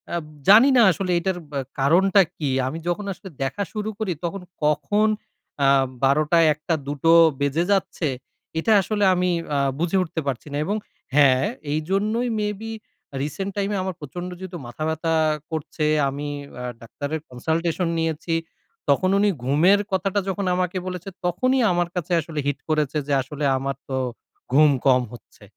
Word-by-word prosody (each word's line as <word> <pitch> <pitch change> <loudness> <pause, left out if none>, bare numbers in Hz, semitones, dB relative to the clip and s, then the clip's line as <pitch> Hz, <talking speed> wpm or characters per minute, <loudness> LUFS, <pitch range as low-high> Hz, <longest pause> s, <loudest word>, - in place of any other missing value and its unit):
আব 170 - -2 0.2
জানি 225 +7 +8
না - - +7
আসলে 185 +2 -2
এটার 185 +1 -1
বা 140 - -2 0.2
কারণটা 185 +8 +5 0.2
কি? 150 -3 -1 0.2
আমি 155 +5 -4
যখন 175 +4 -1
আসলে 190 +1 -11
দেখা 135 +10 -2
শুরু 215 -1 -3
করি, 215 -4 -1
তখন 175 +3 -3 0.2
কখন 205 +8 +2 0.6
আ - - +5 0.4
১২ 140 +3 +4
টা, 170 - +6
১ 150 - -21
টা, 170 - +2
দুটো 145 +3 +1 0.3
বেজে 140 +4 +1
যাচ্ছে, 190 -4 0 0.5
এটা 220 - +1
আসলে 205 +2 -1
আমি 180 0 +1 0.3
আ - - +2 0.2
বুঝে 175 +3 +1
উঠতে 165 -1 -4
পারছি 135 +1 -3
না - - -1
এবং 205 - -1 0.4
হ্যা, 145 -1 +6 0.4
এইজন্যই 200 +10 0
may 210 0 0
be 225 0 -5 0.5
recent 190 +7 -3
time 200 0 0
এ - - 0
আমার 190 -1 -3
প্রচন্ড 175 +5 -6
যেহেতু 185 -1 -7
মাথা 120 +6 -6
ব্যাথা 160 +1 -1 0.4
করছে, 155 -1 -3 0.2
আমি 145 +2 -5 0.3
আ - - -5 0.2
ডাক্তারের 145 +6 -5
consultation 165 +7 -1
নিয়েছি। 160 +1 -2 0.6
তখন 165 +7 +3
উনি 205 +1 +3
ঘুমের 160 +10 +4
কথাটা 190 +1 +1
যখন 195 +1 -2
আমাকে 180 0 -1
বলেছে, 180 +1 -5 0.2
তখনই 255 +9 +2
আমার 175 -1 +1
কাছে 180 0 -3
আসলে 155 -1 -6
হিট 140 -1 -1
করেছে 150 -1 +1
যে, 145 - 0
আসলে 140 +3 -6
আমার 135 +1 -3
তো 135 - -2 0.6
ঘুম 150 +3 +6 0.2
কম 130 -2 +5
হচ্ছে। 120 - -15
170 Hz, 165 wpm, -23 LUFS, 145-195 Hz, 0.6 s, জানি